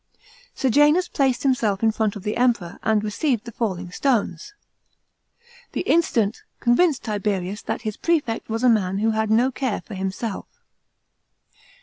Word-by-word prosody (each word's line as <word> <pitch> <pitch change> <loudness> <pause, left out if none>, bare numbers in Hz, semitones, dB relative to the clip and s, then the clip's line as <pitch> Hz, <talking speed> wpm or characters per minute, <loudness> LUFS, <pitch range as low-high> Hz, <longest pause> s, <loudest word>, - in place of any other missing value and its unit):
Sejanus 295 +7 +3
placed 265 -3 0
himself 230 -7 +1
in 220 - +4
front 215 -1 -1
of 205 - -8
the 210 - -2
Emperor, 230 -8 0
and 215 -1 +1
received 235 +2 -1
the 235 - -7
falling 185 -6 -3
stones. 275 - -1 1.2
This - - -2
incident 230 -10 +1 0.2
convinced 270 +4 +2
Tiberius 205 -2 -2
that - - -4
his 215 -2 -4
prefect 295 -12 -1
was 225 +2 -2
a - - +5
man 195 -4 +2
who 220 +2 +1
had 220 0 0
no 240 +4 +3
care 260 -4 -2
for 220 - -11
himself. 195 +3 -4
225 Hz, 145 wpm, -23 LUFS, 205-255 Hz, 1.2 s, a